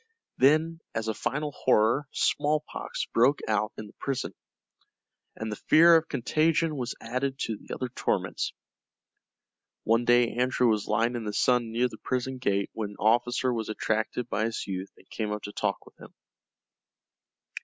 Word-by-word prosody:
Then 155 +5 +4 0.2
as 115 0 -2
a 110 - 0
final 150 +7 -2
horror 125 +2 +2
smallpox 150 +1 -1
broke 130 +5 +4
out 105 0 +1
in 110 - -6
the 105 - -14
prison, 135 -2 -3 1.0
and 110 0 -5
the 105 - -6
fear 170 +2 +8
of 160 0 +3
contagion 155 +5 +1
was 125 -3 -3
added 130 +3 -2
to 110 - -1
the - - -13
other 130 - -3
torments. 125 - -1 1.3
One 115 +2 +3
day 120 0 +4
Andrew 125 0 +2
was 105 -2 0
lying 115 +3 +1
in 115 -2 -4
the 105 - -3
sun 120 +1 +2
near 120 +2 +2
the 110 -3 -12
prison 130 +1 -2
gate 100 -4 0
when 110 -2 -3
an 100 - -12
officer 120 +3 +2
was 110 -2 -3
attracted 110 +2 -1
by 110 -2 0
his 115 0 -3
youth 95 0 -4
and - - -21
came 110 -2 -3
up 105 0 -4
to 105 - -6
talk 105 -1 -2
with - - -17
him. - - -12
120 Hz, 165 wpm, -28 LUFS, 110-130 Hz, 1.3 s, fear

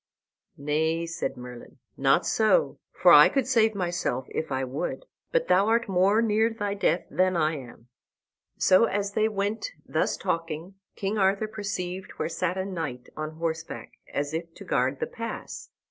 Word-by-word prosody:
"Nay," 160 +3 0
said 165 0 -4
Merlin, 125 +2 -10 0.2
"not 135 +6 +3
so, 225 - +2
for - - +5
I - - +9
could 270 -3 0
save 225 -4 +3
myself 175 -9 -1
if 160 - -4
I 130 0 0
would; 140 - -4 0.3
but - - +1
thou 195 +3 +4
art 230 +1 +2
more 195 +4 +3
near 220 0 +3
thy 205 -3 -3
death 195 -3 +1
than 185 -1 +2
I 155 -1 +1
am." 120 -3 -12 0.7
So, 185 +5 +5
as 205 -2 -1
they 215 +1 +2
went 210 - -2
thus - - 0
talking, 165 +2 -3 0.2
King 205 +2 -2
Arthur 195 +2 +2
perceived 190 -3 -5
where - - -3
sat 180 +2 -1
a 190 - -1
knight 160 -10 -5
on 155 0 -5
horseback, 165 0 -4 0.2
as 145 +1 -2
if 165 +1 -4
to - - -10
guard 130 +2 0
the - - 0
pass. 230 0 -7
185 Hz, 165 wpm, -27 LUFS, 155-210 Hz, 0.7 s, I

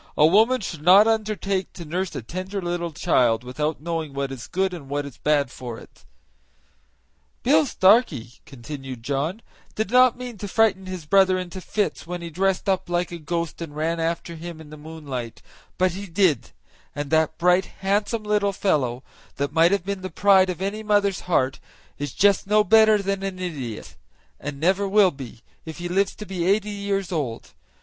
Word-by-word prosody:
"A 150 - +6
woman 220 +9 +4
should 165 -5 -6
not 190 +6 +7
undertake 210 -4 -1
to 170 - -9
nurse 180 +4 -3
a - - -5
tender 185 - -5
little 175 -1 -3
child 120 -6 +2
without 150 +5 -3
knowing 160 -3 -3
what 140 0 -3
is 130 -3 -7
good 190 0 -1
and 145 -6 -9
what 145 0 -2
is 135 -5 -11
bad 145 -4 +1
for 120 -3 -7
it." - - -16 1.4
"Bill 295 +4 +4
Starkey," 185 - +3
continued 130 -1 -8
John, 145 - -2 0.3
"did 220 -1 -2
not 250 0 +5
mean 245 -4 -8
to 205 - -5
frighten 195 -2 +2
his 185 -4 -6
brother 190 +2 +4
into 185 +1 -6
fits 205 -4 -2
when 175 0 -5
he 170 - -6
dressed 190 +3 0
up 190 -2 0
like 175 0 -1
a 170 - -6
ghost 170 +2 -3
and 155 -3 -7
ran 165 +2 -1
after 165 +1 -2
him 165 0 -8
in 155 -2 -12
the - - -8
moonlight; 150 -6 -7 0.3
but 185 0 +2
he 200 +3 -7
did; 170 - +1 0.5
and 145 -1 -4
that 160 0 +2
bright, 180 +2 +3 0.2
handsome 205 +3 0
little 210 -1 +1
fellow, 130 -11 0 0.3
that 140 +1 -2
might 165 +2 +5
have 200 -3 0
been 200 -1 -3
the 185 - -5
pride 190 +1 +4
of 180 +1 -3
any 205 +2 -3
mother's 205 -2 +1
heart 130 -6 +1 0.4
is 145 -2 -3
just 200 +3 +3
no 210 +1 +4
better 220 +1 +5
than 195 0 -1
an 195 -1 -4
idiot, 145 -12 -6 0.4
and 145 -1 -6
never 190 +5 +2
will 195 -1 +5
be, 130 -5 -10 0.2
if 160 -1 -8
he 175 - -4
lives 195 +3 0
to 210 - -8
be 190 -3 -3
eighty 210 +2 +2
years 200 -2 -2
old. 140 -9 -4
180 Hz, 190 wpm, -23 LUFS, 150-200 Hz, 1.4 s, not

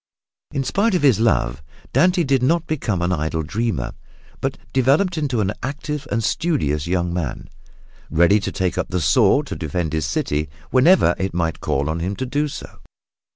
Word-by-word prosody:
In 140 -2 -1
spite 200 - +1
of 175 - 0
his 130 -7 +5
love, 70 - +1 0.3
Dante 180 +6 +4
did 135 -3 +2
not 165 +6 +2
become 110 - -1
an 90 - 0
idle 80 -1 -1
dreamer, 100 - -2 0.5
but - - -2 0.2
developed 140 +8 +3
into 140 -8 0
an 100 0 0
active 145 +2 -4
and 115 - -1
studious 100 - 0
young 90 -1 0
man, 65 -8 -4 0.6
ready 85 +6 +4
to - - -3
take 95 -2 -1
up - - -1
the 90 - -1
sword 75 -3 +3
to - - -5
defend 80 0 -3
his 80 -2 0
city 75 0 -1 0.2
whenever 130 - +5
it 95 -2 -2
might 85 -2 -1
call 70 +2 0
on 80 +2 -2
him 95 +4 -2
to 130 - -3
do 145 +4 0
so. 145 - -9
100 Hz, 180 wpm, -21 LUFS, -, 0.6 s, his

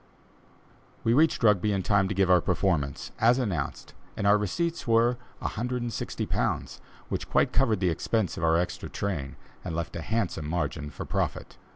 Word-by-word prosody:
We 115 - +3
reached 155 0 +3
Rugby 105 -1 +4
in 95 -2 0
time 100 -1 +3
to 105 - -3
give 95 -1 +3
our 90 -2 +5
performance, 85 -7 0
as 120 +3 +5
announced, 105 -10 -3 0.2
and - - -2
our 100 +1 +6
receipts 165 - -1
were 115 +1 +3 0.2
£160, 120 +1 -2 0.3
which - - -3
quite - - +2
covered 115 -3 +2
the 90 - +3
expense 100 +4 -1
of - - -5
our 80 0 +4
extra 90 +1 -2
train 80 -10 -3 0.3
and 80 - -4
left 85 -2 -3
a 85 - -3
handsome 95 -6 -2
margin 75 -3 -2
for - - -7
profit. - - -3
100 Hz, 165 wpm, -27 LUFS, 85-115 Hz, 0.3 s, our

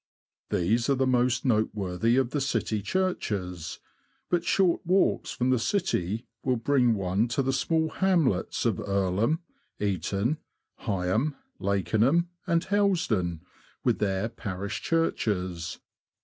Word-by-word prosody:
These 115 +9 +1
are 140 - +4
the 135 0 +1
most 125 0 +2
noteworthy 110 -1 +1
of 130 -2 +2
the 145 - -1
city 115 -5 0
churches; 100 - -2 0.5
but 175 -1 +2
short 180 0 +2
walks 185 +2 +2
from 125 +1 0
the 130 - +3
city 115 - -1 0.2
will 130 -1 +2
bring 125 -1 +3
one 95 +3 +1
to 120 +4 0
the 135 +1 0
small 160 +3 +1
hamlets 165 - +1
of - - +1
Earlham, 100 - 0 0.4
Eaton, 100 - 0 0.5
Heigham, 100 +10 0 0.2
Lakenham, 110 - +2 0.2
and 170 -1 +2
Hellsden, 175 - +1 0.4
with - - +2
their 100 +1 0
parish 100 -2 -5
churches. 95 - -1
115 Hz, 120 wpm, -27 LUFS, 100-155 Hz, 0.5 s, are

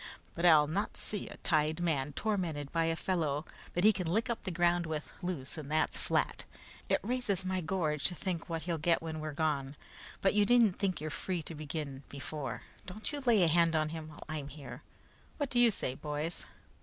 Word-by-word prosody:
But 175 +1 +2
I'll 155 -3 +8
not 175 +8 -2
see 210 - -2
a - - -9
tied 155 -1 +1
man 150 -5 0
tormented 165 -8 -1
by 165 -1 +2
a 165 0 +1
fellow 160 -4 0 0.3
that 175 - +2
he 215 +1 +8
can 185 -3 -2
lick 230 +6 +1
up 235 - -3
the - - -1
ground 175 -1 +2
with, 155 -1 -4
loose, 165 -5 -4
and 145 -2 -7
that's 155 +1 +1
flat. - - 0 0.5
It - - +4
raises 215 -5 0
my 185 0 0
gorge 155 -4 0
to 180 - +4
think 175 -2 -3
what 165 -1 -2
he'll 170 -2 -1
get 165 +1 +2
when 160 -1 -4
we're 155 0 -3
gone, 145 -3 -1 0.5
but 195 - +4
you 210 0 +5
needn't 230 -3 +4
think 190 -6 0
you're 155 0 -3
free 180 0 -2
to 165 - -6
begin 150 -2 -5
before. 140 0 -5 0.2
Don't 210 +8 -4
you 295 - -1
lay 235 -8 +4
a - - +5
hand 165 0 +4
on 155 -1 +2
him 160 -1 -6
while 150 - -10
I'm 155 -3 -4
here! 145 0 -9 0.6
What 285 -3 -2
do 245 - +2
you 240 -1 +7
say, 130 - -1
boys?" 150 +4 -4
165 Hz, 210 wpm, -33 LUFS, 150-185 Hz, 0.6 s, I'll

